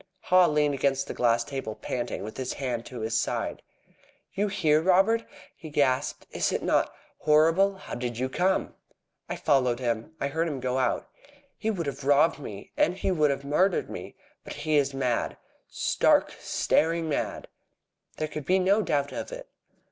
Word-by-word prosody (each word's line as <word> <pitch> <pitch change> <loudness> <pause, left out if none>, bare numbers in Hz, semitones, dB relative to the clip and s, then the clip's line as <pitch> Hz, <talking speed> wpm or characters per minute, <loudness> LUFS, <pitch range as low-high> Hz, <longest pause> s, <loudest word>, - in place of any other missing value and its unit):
Haw 185 -1 +5
leaned 150 -1 +2
against 135 0 +1
the - - -5
glass 115 -1 +2
table 130 -4 -5
panting, 120 -1 -4
with 110 - -7
his 130 -1 -3
hand 125 -4 -3
to 125 -3 -7
his 110 +1 -2
side. - - -1 0.7
"You 205 +2 0
here, 155 -6 +2
Robert?" 195 +6 +4 0.3
he 160 - -10
gasped. 140 -1 0
"Is - - 0
it - - -2
not - - +2 0.3
horrible? 165 +6 +4
How 190 - -10
did 120 -1 -3
you 130 +2 0
come?" 180 +8 0 0.6
"I - - -2
followed 130 -5 +2
him. 120 +3 -2
I 140 - -1
heard 165 +3 0
him 145 -4 -3
go 130 +1 -1
out." 130 - 0 0.5
"He 220 - -2
would 180 -7 -2
have 140 0 -5
robbed 145 +3 +4
me. 105 -8 -8
And 180 - +2
he 190 - 0
would 155 -4 +3
have 140 0 -2
murdered 180 +7 +1
me. - - -8 0.3
But - - -7
he 155 -1 -1
is 140 -1 +3
mad 130 -3 -1 0.3
stark, - - +2
staring 165 +1 +1
mad!" 150 - -2 0.7
There 155 - -1
could 150 -1 -7
be 185 - +4
no 195 +3 +3
doubt 145 -7 0
of - - -5
it. - - -8
145 Hz, 180 wpm, -27 LUFS, 130-170 Hz, 0.7 s, Haw